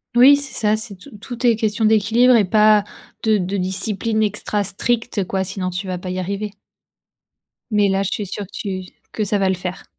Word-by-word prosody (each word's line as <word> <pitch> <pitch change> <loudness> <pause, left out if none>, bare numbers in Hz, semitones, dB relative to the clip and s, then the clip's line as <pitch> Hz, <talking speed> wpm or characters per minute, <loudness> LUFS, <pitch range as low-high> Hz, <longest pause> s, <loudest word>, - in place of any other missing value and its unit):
Oui 260 +4 +8
c'est 280 -3 -5
ça, 215 -1 +1
c'est 215 -2 -6
tout 180 - -14
tout 245 0 -5
est 230 - +5
question 215 0 0
d'équilibre 225 +4 +4
et 215 - +5
pas 210 +1 +4 0.4
de 220 -1 +3
de 190 +1 -2
discipline 200 +4 -1
extra 210 0 -1
stricte 225 +1 -1
quoi. 190 +1 -2
Sinon, 185 -1 -3
tu 180 +2 -5
vas 180 -1 -3
pas 180 +1 -7
y 185 0 -3
arriver. 200 +3 -3 1.2
Mais 205 -1 +3
là, 195 0 +1
je 195 - -1
suis 210 - -2
sûre 200 +2 -5
que 190 - -22
tu 190 -3 -5 0.3
que 215 - -1
ça 205 0 0
va 195 -1 +1
le 190 - +1
faire. 180 +1 -6
205 Hz, 210 wpm, -20 LUFS, 190-220 Hz, 1.2 s, Oui